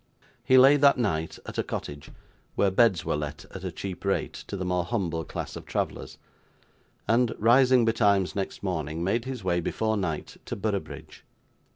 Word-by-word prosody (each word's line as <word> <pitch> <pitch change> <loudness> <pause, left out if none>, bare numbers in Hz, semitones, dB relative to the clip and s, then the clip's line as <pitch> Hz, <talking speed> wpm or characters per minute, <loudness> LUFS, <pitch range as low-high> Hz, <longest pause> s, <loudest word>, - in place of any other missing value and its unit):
He 130 +1 +5
lay, 135 +3 +7
that 140 -1 +5
night, 80 -9 -1
at - - -6
a - - +1
cottage, 70 0 -6 0.5
where 100 - +2
beds 95 -4 +3
were - - 0
let 75 +1 -5
at 95 - -8
a 95 - -3
cheap 90 +2 -7
rate 100 -1 -1
to 100 - -5
the 95 - -3
more 90 -1 0
humble 85 -2 -2
class - - -6
of - - -9
travellers; - - -3 0.9
and, 115 0 +2
rising 125 +2 +5
betimes 100 -4 +2
next 100 0 -4
morning, 80 -3 -3
made 115 +6 0
his 130 -5 -5
way 90 -1 +1
before 110 +5 -1
night 85 -6 -4
to - - -4
Boroughbridge. 100 -1 -5
100 Hz, 175 wpm, -27 LUFS, 85-115 Hz, 0.9 s, lay